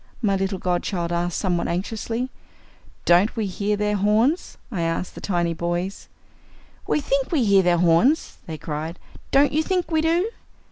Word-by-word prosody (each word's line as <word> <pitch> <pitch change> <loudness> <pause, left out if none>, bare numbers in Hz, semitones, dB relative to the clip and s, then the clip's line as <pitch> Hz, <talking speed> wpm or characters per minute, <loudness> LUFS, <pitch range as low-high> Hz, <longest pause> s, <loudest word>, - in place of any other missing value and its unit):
my 205 -5 +1
little 195 0 -1
godchild 175 -1 -1
asked 175 0 -1
somewhat 180 -3 0
anxiously. 225 +7 -3 0.7
"Don't 180 +7 +4
we 220 -3 -1
hear 200 +2 -1
their 210 0 0
horns?" 215 - +1
I 190 -7 -2
asked 165 +2 -2
the - - -10
tiny 175 -3 0
boys. 175 +3 -3 0.8
"We - - +2
think 275 -2 0
we 300 -7 +2
hear 200 -2 +5
their 175 -1 +3
horns," 175 - +3
they 160 -2 -5
cried. 155 +2 -5 0.3
"Don't 280 +1 +4
you 310 - +2
think 360 0 -1
we 315 -1 +3
do?" 340 +7 +1
195 Hz, 160 wpm, -23 LUFS, 175-255 Hz, 0.8 s, hear